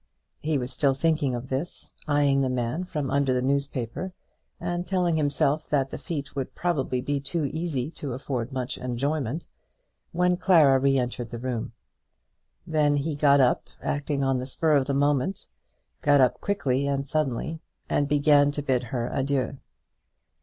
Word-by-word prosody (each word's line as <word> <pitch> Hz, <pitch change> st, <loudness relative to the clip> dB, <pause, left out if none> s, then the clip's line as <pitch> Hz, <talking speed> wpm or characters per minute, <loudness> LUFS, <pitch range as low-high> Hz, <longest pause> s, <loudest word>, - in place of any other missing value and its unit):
He 155 Hz, 0 st, 0 dB
was 125 Hz, -1 st, -3 dB
still 140 Hz, -2 st, +2 dB
thinking 150 Hz, -3 st, +1 dB
of 120 Hz, +2 st, -6 dB
this, 135 Hz, +6 st, -4 dB
eyeing 145 Hz, -2 st, +3 dB
the 130 Hz, -, +1 dB
man 125 Hz, +7 st, -1 dB
from 150 Hz, -6 st, -3 dB
under 140 Hz, -2 st, +2 dB
the 125 Hz, -, +1 dB
newspaper, 140 Hz, +5 st, -2 dB, 0.5 s
and 175 Hz, 0 st, -3 dB
telling 180 Hz, -2 st, +1 dB
himself 145 Hz, 0 st, +1 dB
that 135 Hz, -2 st, +1 dB
the -, -, -5 dB
feat 145 Hz, -6 st, -5 dB
would 135 Hz, -2 st, -4 dB
probably 140 Hz, -7 st, 0 dB
be 145 Hz, +2 st, -1 dB
too 140 Hz, +3 st, -2 dB
easy 150 Hz, -2 st, -2 dB
to 140 Hz, -6 st, -5 dB
afford 130 Hz, -2 st, -3 dB
much 130 Hz, 0 st, -3 dB
enjoyment, 135 Hz, +3 st, -2 dB, 0.7 s
when 180 Hz, +1 st, +2 dB
Clara 155 Hz, -8 st, +5 dB
re 135 Hz, 0 st, +3 dB
entered 125 Hz, -1 st, -2 dB
the 120 Hz, -, -6 dB
room. 120 Hz, -2 st, -3 dB, 0.9 s
Then 150 Hz, -2 st, +2 dB
he 145 Hz, +2 st, -1 dB
got 140 Hz, -1 st, +4 dB
up, 125 Hz, -1 st, +2 dB
acting 145 Hz, -1 st, -1 dB
on 135 Hz, -1 st, +1 dB
the 130 Hz, -, -5 dB
spur 155 Hz, +3 st, +2 dB
of 135 Hz, -2 st, +2 dB
the 140 Hz, -, 0 dB
moment, 145 Hz, +6 st, +1 dB, 0.6 s
got 145 Hz, -1 st, +5 dB
up 130 Hz, -2 st, +3 dB
quickly 140 Hz, -9 st, 0 dB
and 140 Hz, 0 st, -1 dB
suddenly, 155 Hz, +2 st, -2 dB, 0.3 s
and 145 Hz, -, +1 dB
began 145 Hz, 0 st, +4 dB
to 145 Hz, -, -3 dB
bid 130 Hz, -3 st, +1 dB
her 120 Hz, -1 st, -2 dB
adieu. 135 Hz, -1 st, -1 dB
140 Hz, 165 wpm, -26 LUFS, 130-150 Hz, 0.9 s, Clara